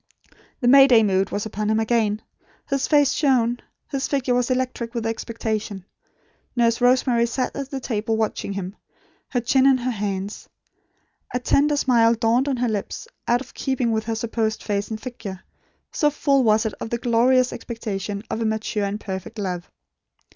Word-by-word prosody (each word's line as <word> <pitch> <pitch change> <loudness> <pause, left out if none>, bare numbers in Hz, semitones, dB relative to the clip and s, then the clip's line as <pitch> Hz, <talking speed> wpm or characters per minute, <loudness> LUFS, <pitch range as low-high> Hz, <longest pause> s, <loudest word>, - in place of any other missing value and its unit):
The 245 - +1
May 270 +2 +8
Day 235 -4 +6
mood 195 -1 +1
was 205 - -3
upon 215 0 -3
him 220 0 +2
again. 220 -2 +1 0.4
His 275 -1 0
face 290 -3 +4
shone. 245 -5 +2 0.3
His 275 -1 -1
figure 270 -3 0
was 245 0 +1
electric 250 -2 -2
with 230 -1 -2
expectation. 220 -3 -3 0.7
Nurse 230 -1 +2
Rosemary 245 -1 +3
sat 250 +1 -2
at 275 -1 -4
the 275 - -4
table 225 -3 -1
watching 215 -2 -2
him; 195 0 -5 0.5
her 250 - 0
chin 260 +3 +3
in 270 -1 +5
her 255 0 -2
hands. 200 -2 -4 0.9
A - - +2
tender 290 +4 +2
smile 235 -4 +4
dawned 235 +4 +2
on 270 -3 0
her 245 0 0
lips, 210 -3 -4 0.2
out 240 +1 +3
of 270 - -11
keeping 260 -3 -1
with 220 -1 -1
her 225 0 -2
supposed 220 -1 -2
face 205 -1 -1
and 220 -1 -4
figure; 215 -6 -7 0.5
so 295 - +2
full 280 -2 +2
was 220 0 +3
it 220 - -1
of - - -4
the 235 - -1
glorious 245 +2 +3
expectation 205 -3 -5
of 225 - -3
a - - 0
mature 220 -1 -1
and 200 +1 -3
perfect 190 +2 -6
love. 180 -4 -4
230 Hz, 175 wpm, -23 LUFS, 215-255 Hz, 0.9 s, May